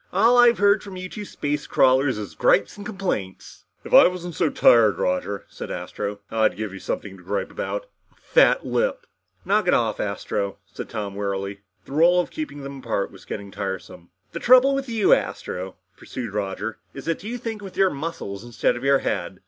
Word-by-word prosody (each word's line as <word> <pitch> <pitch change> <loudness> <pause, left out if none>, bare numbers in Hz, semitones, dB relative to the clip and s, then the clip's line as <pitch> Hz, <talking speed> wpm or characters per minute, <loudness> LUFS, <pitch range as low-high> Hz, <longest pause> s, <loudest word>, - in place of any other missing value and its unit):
"All 235 +2 +4
I've 240 -1 +6
heard 205 0 +4
from 195 -2 -9
you 185 0 -5
two 210 +2 -7
space 145 -5 -3
crawlers 130 -1 +3
is 100 -6 -6
gripes 100 +5 +2
and 205 - -9
complaints." 190 - -5 0.2
"If - - -8
I - - +9
wasn't 180 -1 -5
so 165 0 +1
tired, 115 -7 +5
Roger," 95 +2 -1
said - - -8
Astro, 100 +3 -5
"I'd 110 -5 +2
give 110 -2 -4
you 95 - -8
something 95 0 -5
to 90 - -16
gripe 100 +3 -3
about. - - -4 0.3
A - - -31
flat - - +3
lip!" - - -1 0.4
"Knock 205 -1 +2
it - - +5
off, 110 -3 0
Astro," 100 -1 -2 0.2
said - - -7
Tom 105 -3 -4
wearily. 100 0 -3 0.3
The - - -14
role 170 +5 +5
of 175 - -1
keeping 300 - -6
them 140 0 -7
apart 110 -5 -2
was 95 - -15
getting 100 -1 -6
tiresome. 95 -3 -6 0.2
"The 170 - -5
trouble 255 +5 +6
with 275 -1 -2
you, 220 -4 +4
Astro," 95 +1 -2 0.2
pursued 120 -6 -7
Roger, 105 +2 -3 0.2
"is 135 - -8
that 165 +2 -2
you 235 +4 -4
think 225 -3 -5
with 195 -2 -10
your 190 -1 +4
muscles 140 -9 -5
instead 120 -1 0
of 120 - -7
your 140 0 +5
head." 90 +1 -2
135 Hz, 195 wpm, -23 LUFS, -, 0.4 s, I